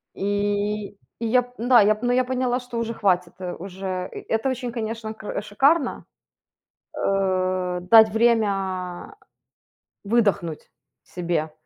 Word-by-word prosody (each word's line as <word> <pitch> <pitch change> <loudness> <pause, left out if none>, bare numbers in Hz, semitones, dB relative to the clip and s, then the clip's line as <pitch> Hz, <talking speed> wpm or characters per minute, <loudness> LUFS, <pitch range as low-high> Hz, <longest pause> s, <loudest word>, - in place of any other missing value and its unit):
И 205 +1 -1 0.3
и - - -1
я, 250 +2 +4 0.2
м-да, 240 -2 +5 0.2
ну, 245 +1 +2
поняла, 255 0 0
что 245 -1 -7
уже 230 0 -2
хватит, 180 -5 +1
э, 180 -1 -4
уже 185 0 -5
и - - -6
Это 225 +4 +1
очень, 250 -2 -3
конечно, 225 -1 -4
кр 210 -1 -5
шикарно, 275 +10 +1 0.9
э, 185 -2 0
дать 220 +3 +7
время 200 - 0 0.9
выдохнуть 200 -7 0 0.3
себе. 170 -3 -3
205 Hz, 115 wpm, -23 LUFS, 185-235 Hz, 0.9 s, дать